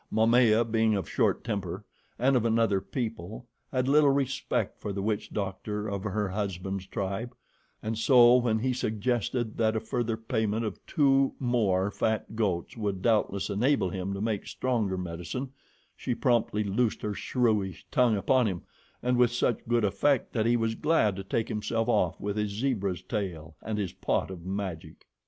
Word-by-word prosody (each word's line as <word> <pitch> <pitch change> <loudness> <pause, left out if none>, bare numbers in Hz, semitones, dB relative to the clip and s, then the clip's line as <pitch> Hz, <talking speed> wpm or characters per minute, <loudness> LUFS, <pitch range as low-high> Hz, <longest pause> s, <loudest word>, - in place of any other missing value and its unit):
Momaya, 115 0 +4
being 110 -1 +2
of 100 - -2
a - - -13
short - - +1
temper 100 -7 -4 0.3
and 130 +3 +3
of 120 - +3
another 115 -4 +2
people, 110 -3 -5 0.3
had 130 -1 0
little 145 +1 +5
respect 135 -1 -1
for 105 - -4
the 100 0 -3
witch 105 0 -1
doctor 105 +1 -3
of 100 -2 -3
her 105 -1 -1
husband's 95 -1 -3
tribe, 100 +7 -4 0.5
and 110 0 -2
so, 120 0 +7
when 120 -3 +1
he 130 +3 0
suggested 120 0 -1
that 110 -1 +2
a - - +1
further 115 0 -2
payment 110 -1 -1
of 105 - -6
two 135 -2 +3
more 105 -7 +1
fat 110 +1 -1
goats 95 -6 -1
would 100 -5 -3
doubtless 105 -4 +1
enable 105 -2 +1
him 95 +1 -3
to 100 0 -4
make 110 -2 -2
stronger 110 -7 -1
medicine, 90 +9 -5 0.4
she 125 - -3
promptly 115 -4 +1
loosed 105 +3 0
her 105 - -1
shrewish 105 -6 0
tongue 120 -4 +3
upon 125 +4 +3
him, 90 -4 -3 0.4
and 125 0 +2
with 120 -1 +4
such 120 -1 +1
good 120 -2 +2
effect 135 +6 +1
that 110 -1 +1
he 120 0 +3
was 115 -1 0
glad 110 -7 +2
to 95 - -5
take 110 +3 -1
himself 115 +2 -1
off 90 -8 +1
with 100 +1 -3
his 105 -1 0
zebra's 100 -5 -1
tail 90 -7 -4
and 110 -1 -3
his 100 -4 -2
pot - - -1
of 90 -3 -8
magic. 95 -4 -5
110 Hz, 175 wpm, -28 LUFS, 100-120 Hz, 0.5 s, so